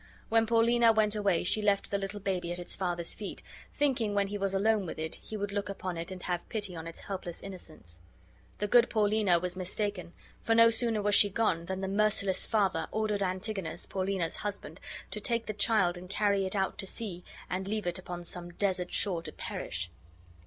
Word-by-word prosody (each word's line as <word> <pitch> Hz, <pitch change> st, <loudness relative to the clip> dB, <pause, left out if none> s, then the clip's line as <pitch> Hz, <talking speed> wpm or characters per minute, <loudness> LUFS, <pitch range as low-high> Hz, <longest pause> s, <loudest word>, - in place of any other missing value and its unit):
When 225 Hz, 0 st, +4 dB
Paulina 230 Hz, 0 st, +5 dB
went 215 Hz, -1 st, +3 dB
away 200 Hz, -5 st, +2 dB
she 215 Hz, +4 st, +1 dB
left 200 Hz, -1 st, +1 dB
the 200 Hz, -, +1 dB
little 200 Hz, +1 st, -4 dB
baby 185 Hz, -3 st, -2 dB
at 175 Hz, -, -2 dB
its 175 Hz, -, 0 dB
father's 175 Hz, -2 st, 0 dB
feet, 205 Hz, -, -7 dB, 0.3 s
thinking 250 Hz, -8 st, +1 dB
when 200 Hz, -1 st, +2 dB
he 205 Hz, -, -3 dB
was 195 Hz, 0 st, +1 dB
alone 205 Hz, -1 st, +2 dB
with -, -, -6 dB
it 160 Hz, 0 st, -4 dB
he 220 Hz, -, -6 dB
would 205 Hz, 0 st, -3 dB
look 200 Hz, -1 st, -2 dB
upon 185 Hz, -2 st, -4 dB
it 165 Hz, +2 st, -4 dB
and 185 Hz, -1 st, -7 dB
have 175 Hz, -1 st, -3 dB
pity 205 Hz, -5 st, -2 dB
on 165 Hz, 0 st, -6 dB
its 165 Hz, -, -7 dB
helpless 185 Hz, -3 st, -5 dB
innocence. 155 Hz, -, -9 dB, 0.6 s
The 210 Hz, -, -1 dB
good 240 Hz, +3 st, +5 dB
Paulina 210 Hz, -4 st, +3 dB
was 180 Hz, +1 st, -2 dB
mistaken, 185 Hz, -1 st, -2 dB, 0.3 s
for 225 Hz, -, +2 dB
no 230 Hz, 0 st, +7 dB
sooner 225 Hz, -2 st, +1 dB
was 205 Hz, 0 st, +2 dB
she 205 Hz, -, +8 dB
gone 195 Hz, -5 st, 0 dB
than 190 Hz, +1 st, -3 dB
the 190 Hz, -, -2 dB
merciless 200 Hz, -1 st, +1 dB
father 195 Hz, -7 st, +1 dB
ordered 215 Hz, -2 st, 0 dB
Antigonus, 190 Hz, 0 st, -1 dB
Paulina's 190 Hz, -3 st, -1 dB
husband, 205 Hz, -1 st, -5 dB, 0.3 s
to -, -, -3 dB
take 235 Hz, -2 st, +1 dB
the 215 Hz, -, -3 dB
child 205 Hz, -4 st, +3 dB
and 180 Hz, +1 st, -11 dB
carry 200 Hz, -1 st, +2 dB
it 190 Hz, -, -3 dB
out 190 Hz, -1 st, -1 dB
to 195 Hz, -, -2 dB
sea 190 Hz, -5 st, -4 dB, 0.2 s
and 190 Hz, +1 st, -3 dB
leave 215 Hz, 0 st, -2 dB
it 175 Hz, +1 st, -1 dB
upon 175 Hz, -1 st, -6 dB
some 175 Hz, 0 st, -6 dB
desert 180 Hz, 0 st, -1 dB
shore 180 Hz, -5 st, +2 dB
to -, -, -7 dB
perish. 90 Hz, 0 st, -4 dB
195 Hz, 205 wpm, -30 LUFS, 180-215 Hz, 0.6 s, she